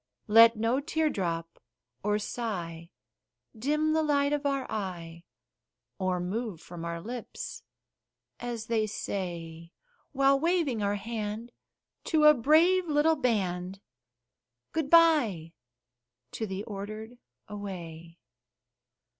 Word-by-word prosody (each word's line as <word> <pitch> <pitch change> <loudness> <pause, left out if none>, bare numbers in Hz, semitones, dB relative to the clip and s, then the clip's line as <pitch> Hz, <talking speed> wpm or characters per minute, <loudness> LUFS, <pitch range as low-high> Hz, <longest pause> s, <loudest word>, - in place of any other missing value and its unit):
Let 230 +1 +7
no 230 +4 +1
tear 315 +1 0
drop 165 -3 -3 0.4
or 210 +1 +1
sigh 175 -7 -4 0.7
dim 300 +7 +1
the 320 - +3
light 285 -1 +2
of 290 -1 0
our 275 -1 -1
eye, 170 -5 -5 0.7
Or 185 -1 0
move 195 +1 -3
from 170 0 -9
our 170 0 -4
lips, 235 +6 -7 0.8
as 240 -2 -4
they 225 -2 0
say 170 -5 -5 0.4
While 275 0 +3
waving 325 -8 +1
our 200 0 +1
hand 215 +2 -5 0.5
to 315 -2 +2
a 300 0 +9
brave 330 +8 +4
little 305 +1 +3
band 190 - -1 0.9
Good 320 -3 -2
by 285 - +4 0.8
to 220 - -4
the 190 +1 -4
Ordered 215 +3 -7 0.3
away. 170 -5 -8
220 Hz, 110 wpm, -29 LUFS, 180-280 Hz, 0.9 s, a